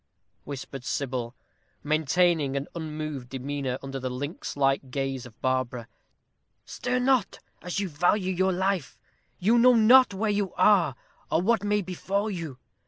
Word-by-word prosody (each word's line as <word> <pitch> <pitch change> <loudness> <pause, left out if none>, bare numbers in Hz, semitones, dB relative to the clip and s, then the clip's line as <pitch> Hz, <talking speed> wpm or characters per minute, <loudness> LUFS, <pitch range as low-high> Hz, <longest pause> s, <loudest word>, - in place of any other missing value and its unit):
whispered 135 -1 -7
Sybil, 125 -3 -3 0.5
maintaining 155 -1 +2
an 140 - -3
unmoved 155 -5 -5
demeanor 135 0 -3
under 135 0 -5
the 130 0 -3
lynx 145 +5 -5
like 135 -1 +1
gaze 135 -1 -3
of 115 - -19
Barbara. 130 -2 -1 0.8
"Stir 250 0 -2
not, 250 -5 +2 0.2
as 180 +2 -3
you 200 - -1
value 180 +4 +1
your 190 +1 +2
life; 190 -4 -1 0.4
you 225 +6 +3
know 250 +1 +6
not 245 +2 +7
where 210 +2 -1
you 205 -2 -1
are, 185 -11 +4 0.3
or 165 - +1
what 225 0 +2
may 205 0 +1
befall 200 +4 -2
you. 165 -8 -6
160 Hz, 145 wpm, -27 LUFS, 135-200 Hz, 0.8 s, not